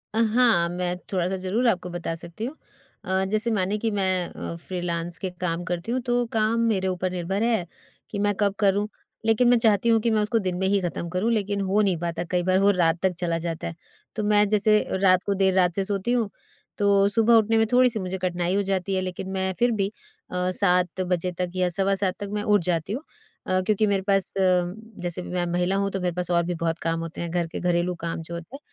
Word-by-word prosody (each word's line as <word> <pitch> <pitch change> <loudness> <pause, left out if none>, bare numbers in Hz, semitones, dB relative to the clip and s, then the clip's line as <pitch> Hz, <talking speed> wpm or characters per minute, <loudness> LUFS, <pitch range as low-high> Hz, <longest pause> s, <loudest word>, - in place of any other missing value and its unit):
अ, - - +2
हाँ, 230 -9 +4
मैं 180 0 -2
थोड़ा-सा 185 0 0
ज़रूर 225 +7 +1
आपको 180 -4 0
बता 175 -1 -4
सकती 170 +7 -7
हूँ। 275 - -5 0.5
अ, 190 0 +1
जैसे 215 +2 0
मानिए 200 0 0
कि 225 +1 -1
मैं 185 -3 0
अ, - - -6
फ्रीलांस 175 -1 -4
के 190 - -3
काम 175 -1 -1
करती 175 +5 -3
हूँ, 255 +1 0
तो 245 0 0
काम 220 +2 +2
मेरे 190 -2 0
ऊपर 185 0 -1
निर्भर 185 +4 -2
है, 225 -7 +1 0.4
कि 205 - -4
मैं 205 0 +2
कब 200 -2 +2
करूँ। 205 +1 +2 0.4
लेकिन 225 +2 +4
मैं 245 - +6
चाहती 220 0 +3
हूँ 225 -1 +5
कि 235 - +1
मैं 215 -1 +2
उसको 220 +2 +1
दिन 180 - 0
में 190 0 0
ही 200 0 +3
खत्म 170 -1 -3
करूँ, 185 +7 0
लेकिन 205 -2 0
हो 205 +3 +3
नहीं 190 -4 +2
पाता 170 0 -3
कई 180 -1 +1
बार 185 +1 +3
वो 200 +1 +5
रात 170 -2 +2
तक 190 -1 +2
चला 170 -2 0
जाता 165 -1 -3
है, 165 - -6 0.4
तो 215 - -2
मैं 210 0 +4
जैसे 215 +1 +4 0.3
रात 185 -1 +5
को 200 - +1
देर 190 -2 +3
से 195 - 0
सोती 200 +3 -2
हूँ, 235 -4 +1 0.5
तो 200 -1 +4
सुबह 225 +3 +3
उठने 225 0 +4
में 225 - +4
थोड़ी-सी 245 -3 +4
मुझे 185 0 -3
कठिनाई 180 0 -1
हो 200 - +2
जाती 190 0 0
है, 185 - +1
लेकिन 185 +1 -5
मैं 190 0 -1
फिर 240 0 +3
भी 195 +1 0 0.4
अ, 180 0 0
7 180 -1 +1
बजे 180 0 0
तक 180 -1 -1
या 185 -1 +2
सवा 195 +3 +1
7 190 -1 0
तक 205 - -4
मैं 210 0 -1
उठ 210 -2 +3
जाती 170 +3 -1
हूँ 265 - -3 0.5
अ, 185 0 +2
क्योंकि 215 +2 +1
मेरे 195 -1 +1
पास 195 -1 +2
जैसे 180 0 -1
मैं 180 -1 -2
महिला 180 +2 +1
हूँ 200 0 +1
तो 195 - -2
मेरे 180 -1 -1
पास 180 0 -3
और 170 0 +3
भी 175 - -2
बहुत 165 0 -2
काम 165 0 -1
होते 165 0 -6
हैं, 170 - -3
घर 170 -1 0
के 165 - -6
घरेलू 175 0 0
काम 165 0 -3
जो 165 +1 -9
होते 170 +9 -7
हैं, 280 - -9
190 Hz, 235 wpm, -25 LUFS, 175-210 Hz, 0.5 s, मैं